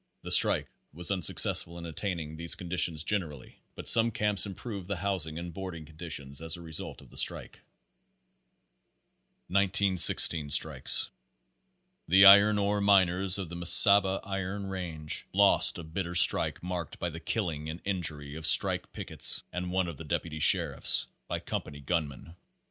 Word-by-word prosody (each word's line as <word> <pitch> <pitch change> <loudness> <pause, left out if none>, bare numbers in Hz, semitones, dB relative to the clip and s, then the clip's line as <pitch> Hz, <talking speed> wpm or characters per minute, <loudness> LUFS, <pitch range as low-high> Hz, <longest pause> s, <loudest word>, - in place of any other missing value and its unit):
The - - -8
strike - - +4 0.3
was 85 +4 -1
unsuccess 90 -5 +3
ful 85 +1 -12
in 85 - -9
obtaining 80 -2 -6
these 85 +1 -1
conditions 85 -3 0
generally, 80 -9 -4 0.2
but - - -9
some 115 0 +7
camps 105 -2 0
improved 100 -1 -8
the 100 - -4
housing 90 -4 -4
and 85 0 -8
boarding 90 -4 -8
conditions 75 -3 -6
as 80 +1 0
a - - -13
result 80 -1 -4
of - - -20
the - - -11
strike. - - -1 1.9
Pagre 100 +1 +1
Thirty 100 +1 -1
1916 80 -3 +5
Strikes. 75 -3 +2 1.0
The 95 +1 +5
iron 100 +2 +7
ore 100 0 -1
miners 95 -1 +2
of 95 -4 -7
the 85 - -9
Mesaba 95 +3 +4
Iron 95 0 -6
Range 85 -5 -6
lost - - +3
a - - -8
bitter 85 +2 -6
strike 85 - +1
marked 90 -2 -6
by 85 - -5
the 80 - -9
killing 80 -6 -4
and 80 +2 -8
injury 80 -7 -4
of 80 0 -4
strike - - +1
pickets - - +1
and 90 0 -5
one 95 -1 -1
of 85 -4 -8
the - - -10
deputy 80 0 -5
sheriffs, - - +2 0.2
by - - -4
com - - -5
pany 70 -1 -14
gunmen. 80 0 -5
85 Hz, 160 wpm, -28 LUFS, 80-95 Hz, 1.9 s, some